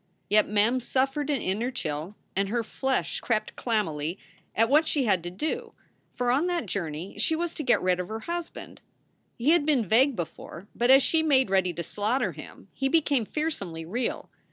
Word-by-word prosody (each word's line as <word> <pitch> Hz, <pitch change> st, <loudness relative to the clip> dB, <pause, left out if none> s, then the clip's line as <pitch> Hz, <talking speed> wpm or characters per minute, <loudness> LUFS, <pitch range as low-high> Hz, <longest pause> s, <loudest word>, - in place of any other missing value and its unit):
Yet 210 Hz, 0 st, +4 dB
Mem 215 Hz, +5 st, +2 dB
suffered 270 Hz, +4 st, 0 dB
an 280 Hz, -5 st, 0 dB
inner 210 Hz, +7 st, -1 dB
chill 165 Hz, -, -4 dB, 0.2 s
and 195 Hz, 0 st, 0 dB
her 235 Hz, +2 st, 0 dB
flesh 265 Hz, +4 st, -2 dB
crept 220 Hz, -3 st, -1 dB
clam 220 Hz, -4 st, 0 dB
mily 155 Hz, +3 st, -4 dB, 0.4 s
at 225 Hz, +1 st, +4 dB
what 300 Hz, +5 st, +4 dB
she 290 Hz, -3 st, +2 dB
had 195 Hz, -7 st, +2 dB
to 175 Hz, -, -5 dB
do; 245 Hz, -, -4 dB, 0.4 s
for 245 Hz, -1 st, 0 dB
on 285 Hz, +8 st, +2 dB
that 350 Hz, -7 st, -1 dB
journey 175 Hz, -2 st, -4 dB
she 320 Hz, -, +3 dB
was 340 Hz, +1 st, -2 dB
to -, -, -5 dB
get 245 Hz, -, +2 dB
rid 180 Hz, -1 st, +2 dB
of 180 Hz, -, -3 dB
her 220 Hz, +2 st, -5 dB
husband. 340 Hz, +5 st, -6 dB, 0.6 s
He 255 Hz, +6 st, +3 dB
had 340 Hz, -2 st, +4 dB
been 285 Hz, -7 st, +2 dB
vague 255 Hz, +7 st, +4 dB
before, 170 Hz, +1 st, -7 dB
but 240 Hz, +1 st, 0 dB
as 270 Hz, 0 st, +8 dB
she 320 Hz, +3 st, +3 dB
made 265 Hz, -9 st, +3 dB
ready 190 Hz, -2 st, +3 dB
to 170 Hz, +1 st, -4 dB
slaughter 210 Hz, -, -1 dB
him 150 Hz, +4 st, -12 dB
he 270 Hz, 0 st, -1 dB
became 285 Hz, -6 st, +2 dB
fearsomely 200 Hz, -, -3 dB
real. 230 Hz, +8 st, -3 dB
235 Hz, 195 wpm, -27 LUFS, 190-275 Hz, 0.6 s, as